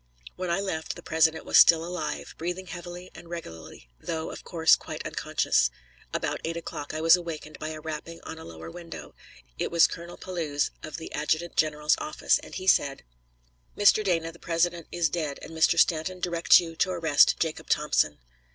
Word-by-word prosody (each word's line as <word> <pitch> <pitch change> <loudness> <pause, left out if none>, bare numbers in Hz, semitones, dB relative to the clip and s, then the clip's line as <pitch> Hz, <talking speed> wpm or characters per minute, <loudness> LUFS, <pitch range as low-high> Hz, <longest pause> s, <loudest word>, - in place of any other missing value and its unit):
When 185 -1 -4
I 170 +3 +1
left, 160 -5 -3
the - - -11
President 160 0 +2
was - - +5
still 165 -1 +7
alive, 170 -4 -4
breathing 175 +3 -3
heavily 175 +1 -8
and 170 - -13
regularly, 80 - -9
though, 160 - -4
of - - -9
course, 165 -1 +4
quite - - -8
unconscious. - - +1 0.4
About - - -2
eight 165 +1 -3
o'clock 150 -3 -6
I 155 - -2
was 165 +1 +7
awakened 165 -3 -7
by 155 - -4
a 155 0 -6
rapping 160 +1 -6
on 160 - -8
a - - -10
lower 80 0 -9
window. 170 -2 -9 0.5
It - - -1
was 170 -1 +6
Colonel 170 +1 -6
Pelouze, 160 -6 -2
of 155 - -7
the 160 - -8
adjutant 155 +3 -1
general's 150 0 +2
office, 305 0 +1
and - - -11
he 185 - -5
said: 140 -7 +3 0.7
"Mr. 205 +1 +5
Dana, 165 -4 0
the 170 - -17
President 170 0 -1
is 175 -2 +1
dead, 150 -3 -3
and - - -9
Mr. 160 +1 +3
Stanton 170 +3 +2
directs 170 -2 +5
you 165 -2 -6
to 185 - +2
arrest 165 -5 +4
Jacob 160 -2 -3
Thompson." 150 - +2
165 Hz, 185 wpm, -27 LUFS, 155-175 Hz, 0.7 s, still